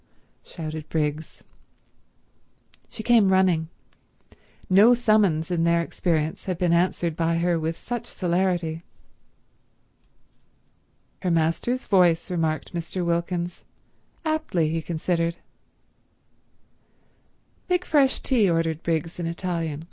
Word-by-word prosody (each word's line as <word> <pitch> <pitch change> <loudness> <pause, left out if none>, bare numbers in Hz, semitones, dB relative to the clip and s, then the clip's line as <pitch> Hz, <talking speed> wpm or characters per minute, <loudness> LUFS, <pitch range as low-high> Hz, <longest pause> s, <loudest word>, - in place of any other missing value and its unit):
shouted 155 -2 -7
Briggs. 150 0 -3 1.5
She 220 - -8
came 225 -4 +4
running. 180 -4 +2 1.0
No 210 +6 +6
summons 205 -9 +2
in 170 -2 +1
their 170 0 +3
experience 160 -2 -2
had 185 -3 -2
been 175 -1 +1
answered 170 -1 +1
by 165 0 0
her 170 0 +1
with 160 +1 -3
such 240 -1 -5
celerity. 175 -3 -1 2.4
"'Her 185 - -1
Master's 165 +10 0
voice,'" 180 -4 +3
remarked 160 -3 -2
Mr. 175 +1 -3
Wilkins; 170 +1 -2 0.6
aptly, 310 - 0
he 165 +1 -1
considered. 170 +1 -1 2.3
"Make 360 0 +1
fresh 275 -3 +2
tea," 230 -8 +2
ordered 165 -1 0
Briggs 165 +1 -2
in 170 - -2
Italian. 165 -3 -3
170 Hz, 100 wpm, -24 LUFS, 165-190 Hz, 2.4 s, No